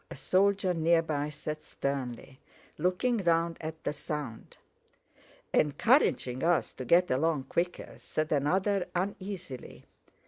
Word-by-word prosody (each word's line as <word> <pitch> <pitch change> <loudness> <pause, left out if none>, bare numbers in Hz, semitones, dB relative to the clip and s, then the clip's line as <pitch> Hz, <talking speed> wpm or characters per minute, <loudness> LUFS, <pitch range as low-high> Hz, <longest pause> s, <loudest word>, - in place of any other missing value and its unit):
a - - -7
soldier 195 -1 +2
near 165 0 +3
by 150 -2 -2
said 150 +1 -6
sternly, 130 -1 -4 0.4
looking 185 +9 +1
round 170 -3 +2
at 160 0 -6
the - - -1
sound. 150 -5 -6 1.0
"Encouraging 150 - +3
us 170 0 +2
to 130 - -6
get 175 +8 +4
along 145 +2 +1
quicker," 175 +5 -2
said 155 0 -3
another 185 +7 +1
uneasily. 185 -6 -5
165 Hz, 115 wpm, -30 LUFS, 145-185 Hz, 1.0 s, get